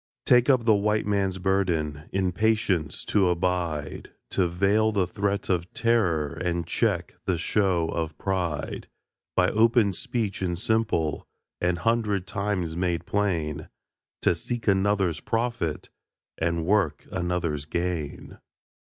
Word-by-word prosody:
Take 125 Hz, +2 st, +5 dB
up 130 Hz, -4 st, +4 dB
the 110 Hz, -, +6 dB
White 105 Hz, +1 st, +1 dB
Man's 100 Hz, -2 st, 0 dB
burden 85 Hz, -6 st, 0 dB
In 95 Hz, -2 st, +1 dB
patience 100 Hz, -6 st, 0 dB
to 95 Hz, -4 st, +3 dB
abide, 85 Hz, -4 st, -2 dB, 0.2 s
To 90 Hz, -, +2 dB
veil 100 Hz, +5 st, +2 dB
the 100 Hz, -4 st, +1 dB
threat 100 Hz, +2 st, -2 dB
of 90 Hz, -1 st, -1 dB
terror 90 Hz, -11 st, +2 dB
And 85 Hz, -1 st, -2 dB
check 90 Hz, 0 st, 0 dB
the 90 Hz, -3 st, +1 dB
show 90 Hz, -1 st, +1 dB
of 80 Hz, -2 st, -3 dB
pride; 90 Hz, -6 st, -2 dB, 0.5 s
By -, -, +4 dB
open 115 Hz, -2 st, +3 dB
speech 105 Hz, +1 st, -3 dB
and 90 Hz, -2 st, -1 dB
simple, 110 Hz, -7 st, 0 dB, 0.3 s
An 85 Hz, 0 st, +2 dB
hundred 105 Hz, 0 st, 0 dB
times 95 Hz, -3 st, -2 dB
made 85 Hz, -1 st, -1 dB
plain, 80 Hz, -7 st, -1 dB, 0.5 s
To -, -, +4 dB
seek 115 Hz, +8 st, -5 dB
another's 95 Hz, -4 st, +2 dB
profit, 115 Hz, -9 st, -2 dB, 0.4 s
And 85 Hz, 0 st, -1 dB
work 95 Hz, -6 st, +1 dB
another's 85 Hz, -4 st, -1 dB
gain. 85 Hz, -2 st, -4 dB
90 Hz, 125 wpm, -26 LUFS, 85-105 Hz, 0.5 s, the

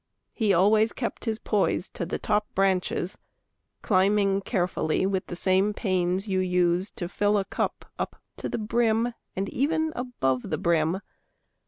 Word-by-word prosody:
He 220 Hz, -4 st, +1 dB
always 210 Hz, +4 st, +4 dB
kept 240 Hz, -1 st, -4 dB
his 220 Hz, -2 st, 0 dB
poise 205 Hz, -3 st, 0 dB
To 170 Hz, -, -5 dB
the -, -, -2 dB
top 210 Hz, 0 st, 0 dB
branches, 190 Hz, -1 st, 0 dB, 0.6 s
climbing 195 Hz, 0 st, +3 dB
carefully 180 Hz, -5 st, 0 dB
With 190 Hz, -1 st, -1 dB
the 175 Hz, -, -5 dB
same 190 Hz, +3 st, +2 dB
pains 185 Hz, -1 st, 0 dB
you 190 Hz, -2 st, +1 dB
use 180 Hz, +1 st, +2 dB
to 175 Hz, -, -4 dB
fill 205 Hz, +3 st, +1 dB
a 195 Hz, -, 0 dB
cup -, -, -3 dB
Up -, -, -3 dB, 0.2 s
to -, -, -4 dB
the -, -, -2 dB
brim, 230 Hz, +1 st, +1 dB, 0.2 s
and 195 Hz, +1 st, -1 dB
even 315 Hz, +3 st, 0 dB
above 135 Hz, -, -1 dB
the -, -, -1 dB
brim. 170 Hz, +2 st, +1 dB
195 Hz, 155 wpm, -26 LUFS, 180-215 Hz, 0.6 s, always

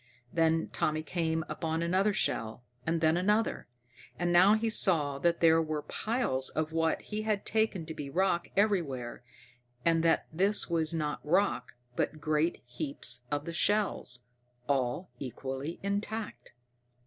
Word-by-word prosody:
Then 165 Hz, -1 st, +2 dB
Tommy 155 Hz, 0 st, -1 dB
came 160 Hz, -1 st, -1 dB
upon 160 Hz, 0 st, -2 dB
another 190 Hz, +5 st, +2 dB
shell, 115 Hz, -, -1 dB, 0.2 s
and 165 Hz, 0 st, +1 dB
then 160 Hz, +1 st, +4 dB
another. 210 Hz, +5 st, +1 dB, 0.5 s
And 175 Hz, 0 st, 0 dB
now 185 Hz, +4 st, +7 dB
he 225 Hz, +1 st, 0 dB
saw 155 Hz, -10 st, +3 dB
that 170 Hz, +3 st, +1 dB
there 165 Hz, -1 st, +6 dB
were 155 Hz, -2 st, -3 dB
piles 215 Hz, -, -1 dB
of 155 Hz, 0 st, -2 dB
what 165 Hz, 0 st, +1 dB
he 215 Hz, 0 st, -4 dB
had 215 Hz, -2 st, -1 dB
taken 220 Hz, -6 st, 0 dB
to 160 Hz, -, -6 dB
be 145 Hz, -3 st, -6 dB
rock 175 Hz, +3 st, +1 dB
everywhere, 155 Hz, -, 0 dB, 0.6 s
and 165 Hz, -1 st, +4 dB
that 165 Hz, 0 st, +3 dB
this 195 Hz, +5 st, +2 dB
was 165 Hz, -2 st, 0 dB
not 155 Hz, -3 st, -2 dB
rock 175 Hz, -5 st, +1 dB, 0.2 s
but 155 Hz, -, -1 dB
great 155 Hz, +2 st, 0 dB
heaps 125 Hz, 0 st, -3 dB
of 145 Hz, 0 st, -2 dB
the 170 Hz, -, -5 dB
shells, 195 Hz, -10 st, 0 dB, 0.4 s
all 135 Hz, +5 st, 0 dB
equally 135 Hz, +4 st, -5 dB
intact. 205 Hz, +2 st, -4 dB
165 Hz, 145 wpm, -31 LUFS, 150-195 Hz, 0.6 s, now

